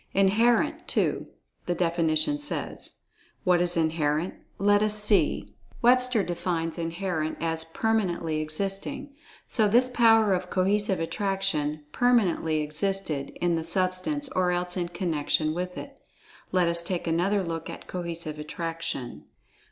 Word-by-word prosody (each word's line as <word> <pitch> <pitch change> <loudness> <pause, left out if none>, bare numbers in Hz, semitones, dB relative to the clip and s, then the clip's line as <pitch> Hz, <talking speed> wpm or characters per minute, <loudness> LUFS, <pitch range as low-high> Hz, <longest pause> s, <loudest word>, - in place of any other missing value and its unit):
"Inherent," 215 +5 +2
too, - - 0 0.4
the 175 - 0
definition 165 - +1
says. 290 - -3 0.5
What 180 -1 +3
is 175 -1 +1
"Inherent?" 160 +1 0 0.2
Let 205 +1 +3
us 210 0 +1
see, 210 -1 +1 0.3
Webster 250 -2 +4
defines 170 -2 -2
"Inherent" 165 -1 -2
as 160 0 0
"permanently 175 -4 -1
existing." 195 - -3 0.3
So 215 -2 +2
this 245 +5 +4
power 225 -4 +5
of 180 0 -2
Cohesive 195 +1 +2
Attraction 165 -4 -1
"permanently 190 -10 +2
existed" 150 -1 -1
in 175 -1 +2
the 165 - -2
Substance 185 - +1
or 185 -7 +1
else 180 0 0
in 175 -2 -1
connection 160 -3 0
with 180 +2 -4
it. - - -9 0.5
Let 180 -2 +3
us 170 0 +3
take 175 0 -3
another 180 +5 +1
look 165 -2 -4
at - - -8
Cohesive 170 -3 -5
Attraction. 165 -4 -5
180 Hz, 130 wpm, -27 LUFS, 165-205 Hz, 0.5 s, power